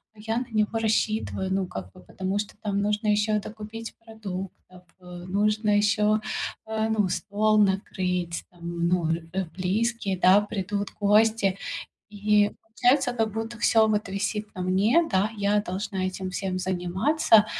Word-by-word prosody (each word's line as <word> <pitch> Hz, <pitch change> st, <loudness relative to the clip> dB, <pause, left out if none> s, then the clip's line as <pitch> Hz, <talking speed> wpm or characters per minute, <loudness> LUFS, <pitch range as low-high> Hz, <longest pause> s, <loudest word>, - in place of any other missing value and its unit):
а -, -, -18 dB
я 225 Hz, +2 st, -2 dB
на 245 Hz, -, -2 dB
него 215 Hz, +1 st, +1 dB
рассчитываю, 215 Hz, -3 st, 0 dB
ну, 190 Hz, -1 st, 0 dB
как 95 Hz, -, -7 dB
бы, -, -, -16 dB
потому 190 Hz, -, -3 dB
что 210 Hz, -, -5 dB
там 200 Hz, -1 st, -1 dB
нужно 210 Hz, +1 st, 0 dB
ещё 210 Hz, 0 st, +2 dB
докупить 220 Hz, +2 st, -8 dB
продуктов, 190 Hz, -4 st, -8 dB, 0.2 s
э, 180 Hz, -, -19 dB, 0.2 s
нужно 210 Hz, +3 st, +1 dB
ещё, 210 Hz, +1 st, +3 dB, 0.5 s
э, 220 Hz, 0 st, -1 dB
ну, 210 Hz, -4 st, +1 dB
стол 210 Hz, +3 st, +1 dB
накрыть, 180 Hz, -3 st, -1 dB
там, 170 Hz, -1 st, -3 dB
ну, 170 Hz, -2 st, +1 dB
э, 170 Hz, +3 st, -3 dB
близкие, 200 Hz, +1 st, 0 dB
да, 185 Hz, +3 st, +6 dB
придут 205 Hz, -1 st, -3 dB
гости. 210 Hz, -1 st, +3 dB, 0.5 s
И 210 Hz, 0 st, +2 dB
получается, 245 Hz, +3 st, +2 dB
как 225 Hz, -3 st, -1 dB
будто 225 Hz, +1 st, -4 dB
всё 220 Hz, -1 st, +4 dB
вот 210 Hz, -2 st, 0 dB
висит 210 Hz, +2 st, -3 dB
на 185 Hz, -, -4 dB
мне, 205 Hz, -, +3 dB
да, 190 Hz, +3 st, +2 dB
я 205 Hz, +1 st, +2 dB
должна 190 Hz, 0 st, -3 dB
этим 185 Hz, 0 st, -4 dB
всем 185 Hz, 0 st, -3 dB
заниматься, 190 Hz, -, +3 dB
205 Hz, 150 wpm, -26 LUFS, 185-220 Hz, 0.5 s, да